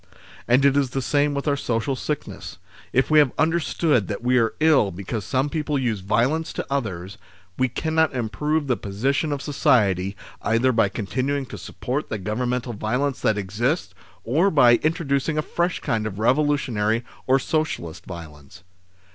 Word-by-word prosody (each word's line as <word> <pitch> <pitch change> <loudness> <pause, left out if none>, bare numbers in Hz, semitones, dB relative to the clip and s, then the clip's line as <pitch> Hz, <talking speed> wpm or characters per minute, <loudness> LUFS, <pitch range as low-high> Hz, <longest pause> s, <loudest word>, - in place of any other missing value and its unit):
And 125 +3 +4
it 140 -1 +4
is 140 -2 +2
the - - +1
same 145 +2 +1
with 140 +2 -3
our 145 - +3
social 125 0 -1
sickness. 150 +2 -5 0.3
If 130 +4 +1
we 155 - +7
have 145 -4 +4
understood 160 - +1
that 105 +1 -5
we 125 +1 +3
are 115 -1 +1
ill 155 -9 +4
because 100 +4 -5
some 130 - 0
people 150 -1 -1
use 120 -6 -1
violence 130 - 0
to - - -4
others, 105 -7 -3 0.4
we 130 - +2
cannot 160 +5 +1
improve 145 +7 -1
the 130 -3 +1
position 135 +10 -1
of 145 -1 -3
society 100 - +2 0.2
either 115 +3 +2
by 115 -4 +2
con 100 +1 -5
tinuing 135 +4 -1
to - - -7
support 135 +5 -4
the 110 - -2
Governmental 120 +4 -2
viol 115 +6 -1
ence 140 -3 -2
that 110 -4 +1
exists, 110 - -1 0.3
or 160 - +2
by 125 -8 +6
introducing 155 -1 0
a 155 - +1
fresh 175 +3 -1
kind 110 -2 -1
of 100 -2 -6
revolutionary, 120 -3 +1 0.2
or 130 +1 +5
socialist 135 - -2
violence. 85 -1 -10
130 Hz, 170 wpm, -23 LUFS, 110-145 Hz, 0.4 s, we